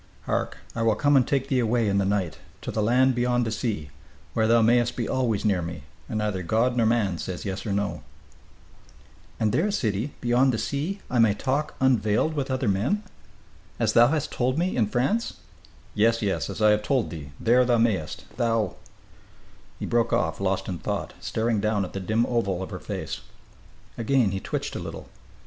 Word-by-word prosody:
Hark! - - -2 0.2
I 115 - -2
will 115 -1 +3
come 145 +5 +3
and 130 -3 +4
take 135 -1 0
thee 130 -2 +1
away 115 -1 +1
in 100 0 +2
the 100 - +1
night, 95 -6 -1 0.2
to - - -3
the 110 - -1
land 125 +4 +4
beyond 120 0 +1
the 110 - -2
sea, 105 - -3 0.4
where 110 -1 +2
thou 115 0 +5
mayest 120 +1 +3
be 120 - -2
always 115 -5 0
near 100 -4 +2
me, 85 -4 -6 0.3
and 110 - -2
neither 105 -3 -1
God 115 +8 +1
nor 115 -2 +3
man 105 -7 +1
say 90 -2 -4
yes 95 0 -4
or - - -1
no!" 100 +1 -1 1.4
"And 110 -1 +2
there, 175 - +1
sidi, 120 - -1
beyond 125 +2 +3
the - - 0
sea, 155 - -2
I 125 - +2
may 110 -3 +5
talk 140 +7 -1
unveiled 125 +2 +2
with 140 -3 -2
other 130 -2 -1
men? 115 - +1 0.8
As - - +2
thou 120 +1 +7
hast 150 +2 -1
told 130 +2 0
me, 180 +3 0
in 110 -4 +2
France 135 - 0 0.3
" - - -25 0.3
"Yes, 115 +2 +2
yes, 100 -2 -1
as 110 - -3
I 105 - +7
have 105 0 +2
told 130 +2 0
thee, 75 -4 -7
there 125 +2 +4
thou 120 -1 +3
mayest 110 -9 0
thou 115 -3 0 0.5
" - - -28
He - - -3
broke 120 0 +1
off, 120 -3 0
lost 95 0 0
in 90 -3 -4
thought, - - -3
staring 115 -1 -1
down 105 -1 +1
at - - -10
the 95 - -3
dim 110 +5 +1
oval 100 -7 -1
of - - -8
her - - -5
face. - - -5 0.8
Again 115 -2 +2
he 95 - -2
twitched - - -4
a - - -3
little. - - -7
115 Hz, 205 wpm, -25 LUFS, 100-125 Hz, 1.4 s, thou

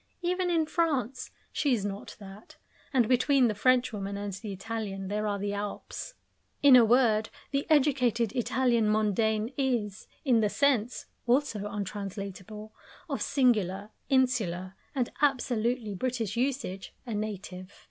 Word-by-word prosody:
Even 360 +1 0
in 330 -2 +2
France 275 -6 -1 0.2
she 280 -4 +2
is 205 -3 -3
not 200 0 -6
that, 200 +1 -12 0.3
and 245 -5 +3
between 260 +1 +4
the 215 - 0
Frenchwoman 210 -4 +1
and 200 -1 -4
the 205 +2 -6
Italian 195 -1 -5
there 210 +1 -1
are 205 -1 -1
the 200 0 -2
Alps. 205 - -5 0.5
In 280 -3 +9
a 245 - +8
word, 225 -2 +3 0.2
the 275 0 -1
educated 255 -7 +3
Italian 240 -1 +1
mondaine 215 +2 +1
is, 230 -7 -1 0.2
in 245 -4 +4
the 210 -2 +2
sense 250 -3 +1 0.2
(also 235 -5 +1
untranslatable) 200 +1 -6 0.3
of 280 -4 -3
singular, 215 -7 +1 0.2
insular, 215 -9 +1 0.2
and 250 -3 0
absolutely 245 -5 +1
British 230 -1 -2
usage, 240 -7 -2
a 235 - -4
Native. 200 -3 -5
225 Hz, 135 wpm, -29 LUFS, 205-255 Hz, 0.5 s, In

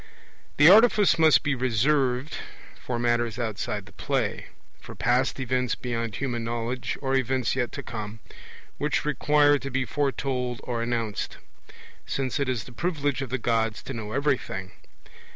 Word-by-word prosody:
The 150 - +7
artifice 205 -3 +6
must 160 -1 +6
be 145 -1 +1
reserved 130 +2 +1 0.4
for 125 - -4
matters 120 -1 0
outside 105 -3 -3
the 105 - -15
play - - -2 0.3
for - - -11
past 125 +3 +1
events 125 -1 0
beyond 115 -3 -3
human 120 -1 -2
knowledge, 120 +2 -3
or 135 0 0
events 130 -2 +1
yet 125 -2 -1
to - - -5
come, 110 -1 -6 0.6
which 150 0 0
require 145 -1 +3
to 135 - -5
be 130 0 -1
foretold 130 -2 -1
or 120 -2 -2
announced; 115 -3 -2 0.7
since 135 -1 -2
it 140 -2 0
is 120 -5 -1
the 125 - -12
privilege 145 -2 -1
of 135 - -4
the 130 - -1
Gods 115 -2 0
to - - -6
know 110 -2 -6
everything. 130 -10 -1
125 Hz, 150 wpm, -26 LUFS, 115-140 Hz, 0.7 s, The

